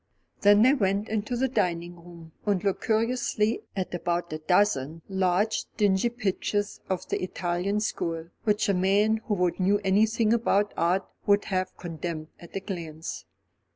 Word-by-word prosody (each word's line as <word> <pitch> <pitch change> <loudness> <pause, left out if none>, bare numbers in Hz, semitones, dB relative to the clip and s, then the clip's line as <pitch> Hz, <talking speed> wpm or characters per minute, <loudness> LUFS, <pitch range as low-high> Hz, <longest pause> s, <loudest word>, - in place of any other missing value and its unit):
Then 205 +1 +6
they 260 +3 +6
went 200 -4 0
into 220 +2 -1
the 265 +2 +2
dining 175 -7 -1
room, 170 -1 -13
and 200 -4 0
looked 195 -2 0
cursorily 225 -1 +1
at 190 -2 -3
about 175 -1 -2
a 155 - -4
dozen 165 -3 +1
large 190 +2 +1
dingy 205 +2 +3
pictures 205 -2 -2
of 185 -2 -2
the - - -1
Italian 185 +2 -1
school, 165 -5 -3
which 210 0 +1
a 200 - +3
man 200 +4 +3
who 180 -5 +1
knew 195 +2 +3
anything 215 +3 +3
about 210 -3 +2
art 180 +3 +1 0.2
would 205 0 +4
have 185 0 -1
condemned 165 -2 -5
at 170 - -13
a 195 - -2
glance. 165 -5 -6
195 Hz, 155 wpm, -27 LUFS, 175-210 Hz, 0.2 s, Then